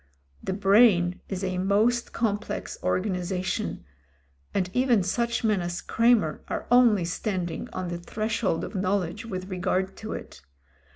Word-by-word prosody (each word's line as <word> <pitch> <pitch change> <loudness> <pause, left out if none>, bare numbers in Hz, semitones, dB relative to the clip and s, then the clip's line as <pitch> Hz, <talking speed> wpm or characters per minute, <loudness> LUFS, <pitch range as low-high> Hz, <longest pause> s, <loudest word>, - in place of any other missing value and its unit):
The - - -2
brain 195 -3 +4
is 190 -1 -3
a 185 -1 -1
most 215 +5 +2
complex 215 -2 -2
organisation, 185 -1 -1 0.7
and 185 -2 0
even 250 -5 +3
such 235 +6 -1
men 215 -4 +2
as 175 0 -3
Cremer 230 -9 +2
are - - -3
only 235 -7 +5
standing 180 -1 -3
on 185 -1 -4
the 175 0 -4
threshold 215 -1 -1
of 190 - -6
knowledge 190 +2 -1
with 185 -2 -5
regard 185 +1 -1
to 220 - -5
it. - - -8
195 Hz, 135 wpm, -26 LUFS, 180-220 Hz, 0.7 s, only